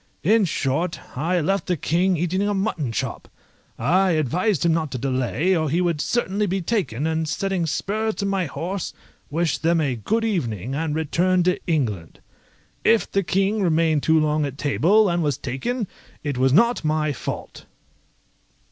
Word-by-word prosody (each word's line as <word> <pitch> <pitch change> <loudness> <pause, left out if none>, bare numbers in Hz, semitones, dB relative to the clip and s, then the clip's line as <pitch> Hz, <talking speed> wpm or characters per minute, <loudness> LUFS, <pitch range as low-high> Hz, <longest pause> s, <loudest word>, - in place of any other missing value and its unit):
In 215 +4 +4
short, 160 +2 -2
I 170 +7 0
left 195 +5 0
the 180 -2 0
King 175 +5 +1
eating 175 +4 0
a 205 0 0
mutton 185 - -1
chop. - - -4 0.5
I 180 +8 +2
advised 165 - +1
him 165 - +4
not 160 -2 -1
to - - -2
delay, 135 +8 0
or 155 -3 0
he 165 +5 +1
would 170 -4 0
certainly 210 -3 0
be 195 +1 -1
taken, 170 - -1
and 160 -1 -1
setting 180 +3 -1
spurs 215 +7 -1
to 200 - -2
my 195 -3 0
horse, 175 +7 -4 0.3
wished 160 -1 0
them 165 +1 +2
a 140 -5 0
good 220 - -1
evening, 125 - -2
and 155 +1 -1
returned 175 +3 +1
to 180 - +2
England. 110 - -1 0.6
If 230 -1 +3
the 195 - +2
King 195 +4 0
remained 160 -4 +2
too 160 +2 +3
long 155 0 +1
at 140 -1 -4
table, 175 +9 +3
and 175 -1 +1
was 145 -4 0
taken, 205 - -3 0.4
it 145 -2 -2
was 130 +1 +2
not 235 - +3
my 155 -1 0
fault. - - -6
165 Hz, 170 wpm, -23 LUFS, 145-195 Hz, 0.6 s, In